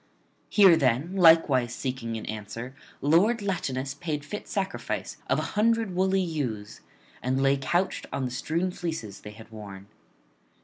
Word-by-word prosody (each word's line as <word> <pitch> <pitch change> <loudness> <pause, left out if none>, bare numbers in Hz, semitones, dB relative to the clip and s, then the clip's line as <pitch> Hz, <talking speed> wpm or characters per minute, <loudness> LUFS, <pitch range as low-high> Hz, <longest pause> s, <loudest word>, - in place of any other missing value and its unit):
Here 195 -5 +7
then, 140 +5 +1
likewise 160 -9 +5
seeking 125 -3 -3
an 110 - -7
answer, 110 +4 -6 0.3
lord 200 +10 +3
Latinus 135 -9 -2
paid 150 -1 -4
fit 210 +6 -6
sacrifice 195 -1 -3
of - - +3
an - - -1
hundred 225 -1 +1
woolly 190 +1 +2
ewes, 125 - -4 0.4
and 130 +1 0
[94 135 +1 +3
127]lay - - -12
couched 175 +7 0
on 135 - -2
the 125 - -3
strewn 165 +8 -1
fleeces 160 - -5
they 105 - -9
had 110 +2 -13
worn. 100 -3 -9
140 Hz, 150 wpm, -27 LUFS, 120-180 Hz, 0.4 s, Here